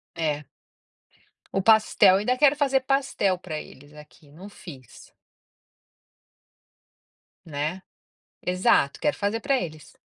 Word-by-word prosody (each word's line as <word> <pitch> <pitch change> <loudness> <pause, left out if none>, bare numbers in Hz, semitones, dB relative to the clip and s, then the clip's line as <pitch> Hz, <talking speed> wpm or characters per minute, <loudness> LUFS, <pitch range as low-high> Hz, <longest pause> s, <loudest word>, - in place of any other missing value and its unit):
É. 150 -3 -2 1.1
O - - 0
pastel 215 -2 +5
ainda 245 +5 0
quero 290 +1 +4
fazer 275 -2 +1
pastel 260 -8 0
para 160 -4 -6
eles 145 +2 -16
aqui. 150 0 -17
Não 185 +7 -12
fiz. 135 - -14 2.3
Né. 155 +4 -4 0.6
Exato, 180 -6 +2
quero 295 - -1
fazer 205 +2 -1
para 275 -1 +1
eles. 155 -4 -9
185 Hz, 105 wpm, -25 LUFS, 150-225 Hz, 2.3 s, pastel